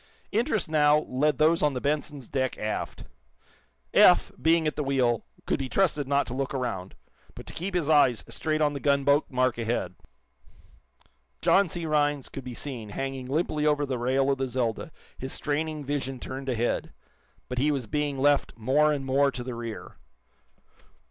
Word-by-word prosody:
Interest, 220 - 0
now, 150 -1 +4
led 145 +1 0
those 160 +2 +3
on 150 -2 +2
the - - -1
"Benson's" 145 -1 -2
deck 130 -2 -1
aft. 105 0 -4 0.9
Eph, - - +6
being 165 +2 +3
at 155 - 0
the 150 - -2
wheel, 130 -4 +1 0.2
could - - 0
be 135 -1 -3
trusted 150 -7 +1
not 140 0 +2
to 120 - -6
look 135 +1 -3
around, 95 -8 -3 0.4
but - - -10
to - - -9
keep 185 +3 -4
his 170 -5 0
eyes 145 -7 +4
straight 155 -1 -1
on 150 -1 +2
the 140 - -4
gunboat 140 +1 +3
mark 130 -2 +1
ahead. 115 -6 -2 1.5
John 195 -2 +4
C. 175 -3 -4
Rhinds 145 -3 +1
could 135 - -7
be 125 -1 -7
seen, 120 -5 -6
hanging 135 +3 -4
limply 150 +1 0
over 145 -1 +2
the 130 -3 -3
rail 135 +3 +2
of 135 - -1
the 135 - 0
"Zelda," 125 +2 -2 0.3
his 130 +1 -4
straining 155 0 -2
vision 135 -2 -3
turned 135 +2 -6
ahead. 120 -1 -1 0.6
But 125 0 -3
he 145 +3 +2
was 140 -5 -1
being 145 +3 -2
left 145 +1 +2
more 140 +7 +3
and 140 -2 -2
more 140 +1 +3
to 125 -2 -6
the 125 0 -5
rear. 115 -2 -7
140 Hz, 175 wpm, -27 LUFS, 130-150 Hz, 1.5 s, Eph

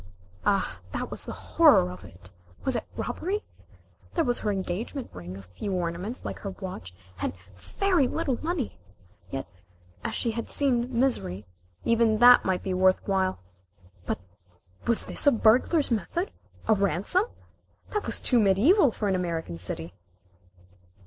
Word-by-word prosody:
Ah, 195 - +1
that - - -3
was - - -2
the - - -5
horror 90 - +4
of 90 - -10
it! 90 +2 -14 0.3
Was 265 - +1
it - - -2
robbery? 405 +4 -2 0.7
There 335 - +3
was 245 -3 +1
her 210 - -1
engagement 200 +8 -4
ring, 90 +1 -8
a 100 - -10
few 95 - -5
ornaments 180 +6 -3
like - - -5
her 200 - -5
watch, 185 - -7 0.3
and - - -1 0.2
very 355 - +1
little 275 -6 -2
money! 315 - -2 0.5
Yet, 135 - -4 0.6
as - - -2
she 230 - 0
had 230 +1 -5
seen 255 -3 +2
misery, 105 - +2 0.4
even 230 -1 +3
that 245 +2 +8
might 185 -1 0
be 190 - -2
worth 185 0 +3
while. 190 - 0 0.6
But - - 0 0.7
was 235 - +1
this - - +1
a - - +9
burglar's 250 +6 +3
method? 235 - -1 0.4
A 220 - +6
ransom? 200 - +1 0.7
That 420 - -2
was - - +1
too 245 - +3
mediæval 235 - +4
for 210 - -1
an 195 - +2
American 165 - -3
city. 85 -1 -2
210 Hz, 150 wpm, -27 LUFS, 180-255 Hz, 0.7 s, a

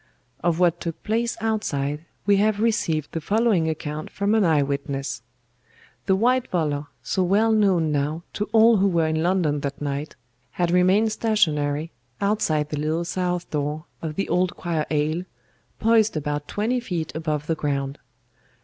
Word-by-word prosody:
"Of 170 -1 +2
what 175 -1 +2
took 165 -2 -5
place 230 +2 0
outside 155 -9 -1 0.2
we 200 0 +4
have 210 +1 +2
received 210 -10 0
the 165 - -3
following 205 -4 +2
account 155 -1 -4
from 200 +2 0
an 220 -2 +4
eye 155 -5 +3
witness. 140 -2 -3 0.9
The 190 - +4
white 245 +5 +2
volor, 150 -4 -1 0.2
so 190 - 0
well 205 +5 +3
known 190 -7 +3
now 150 +3 -1
to 210 - -2
all 225 0 +6
who 195 +1 +3
were 170 -4 +2
in 160 0 0
London 170 -4 +1
that 140 -1 -4
night, 145 +1 -4 0.4
had 175 -1 0
remained 185 +5 +4
stationary 160 -9 +1 0.3
outside 160 -8 +1
the 150 - -3
little 160 +3 -1
south 180 0 -2
door 150 +2 -2 0.2
of 155 -2 -4
the 195 - -1
Old 180 0 +1
Choir 165 -3 -2
aisle, 155 +2 0 0.6
poised 220 -4 +3
about 145 0 -3
twenty 230 +5 0
feet 175 -10 -4
above 155 -2 -2
the 165 - 0
ground. 140 -2 -2
170 Hz, 160 wpm, -24 LUFS, 150-205 Hz, 0.9 s, all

